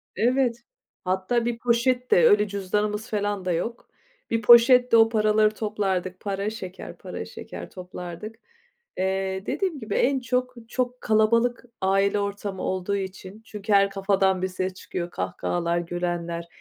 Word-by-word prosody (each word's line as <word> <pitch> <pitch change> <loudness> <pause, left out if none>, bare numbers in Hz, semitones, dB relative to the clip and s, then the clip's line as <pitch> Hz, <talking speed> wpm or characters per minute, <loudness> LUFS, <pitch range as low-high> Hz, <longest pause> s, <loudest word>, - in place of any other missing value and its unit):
Evet, 240 0 +1 0.4
hatta 190 +6 0
bir 240 -1 -1
poşette, 245 -4 +2
öyle 210 0 +4
cüzdanımız 210 +2 -2
falan 205 -2 -2
da 180 - 0
yok. 230 +8 -3 0.4
Bir 230 - 0
poşette 240 +1 +7
o 225 0 +6
paraları 215 -1 +3
toplardık, 190 -4 -2
para, 200 +1 -2
şeker, 190 -4 -8
para, - - -7
şeker - - -9
toplardık. 180 +3 -8 0.6
Eee, 190 0 -1
dediğim 370 -7 -2
gibi 220 -3 -4
en 270 +1 +2
çok, 250 0 -1
çok 250 0 -2
kalabalık 230 +3 +2 0.2
aile 195 +2 +2
ortamı 200 -1 -4
olduğu 190 +2 -1
için 190 +1 -6
çünkü 210 0 -3
her 200 0 +5
kafadan 195 -1 +1
bir 185 - +1
ses 185 0 -3
çıkıyor, 175 -1 -5
kahkahalar, 170 0 -2
gülenler, 170 -1 -3
205 Hz, 135 wpm, -25 LUFS, 185-230 Hz, 0.6 s, poşette